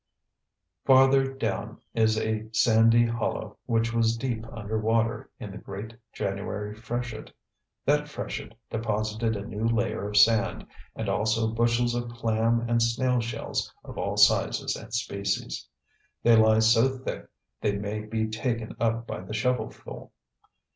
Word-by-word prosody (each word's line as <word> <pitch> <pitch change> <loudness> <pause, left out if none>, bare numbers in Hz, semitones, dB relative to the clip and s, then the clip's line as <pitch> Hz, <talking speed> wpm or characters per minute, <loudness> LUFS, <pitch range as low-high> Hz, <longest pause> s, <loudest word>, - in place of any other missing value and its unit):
Farther 135 0 +5
down 135 - -3
is 110 -1 +3
a 110 0 -2
sandy 115 +1 +5
hollow 115 -2 -3
which 115 -1 +1
was 115 0 +2
deep 115 -3 -3
under 110 -1 -3
water 115 +1 0
in 105 - -7
the 100 - -8
great 100 +3 -7 0.2
January 100 +1 -3
freshet. 120 +1 -5 0.5
That 150 +1 +2
freshet 145 -2 -6 0.2
deposited 110 0 -1
a 100 0 -5
new 105 0 -5
layer 115 -3 0
of 105 - -1
sand 110 0 +4 0.3
and - - -4
also 110 +1 +1
bushels 120 +1 +2
of 120 0 -2
clam 115 0 +1
and 120 0 +2
snail 125 +2 +2
shells 115 0 -3
of - - -8
all - - -2
sizes - - +3
and - - -10
species. 100 -4 -2 0.6
They 115 -1 +6
lie 110 0 +5
so 115 +4 +4
thick 130 - -6 0.3
they 100 -1 +1
may 105 +1 -3
be 110 +1 -2
taken 115 0 -3
up 115 0 0
by 90 - -5
the 95 +4 -6
shovelful. 125 -2 -3
115 Hz, 140 wpm, -27 LUFS, 110-120 Hz, 0.6 s, They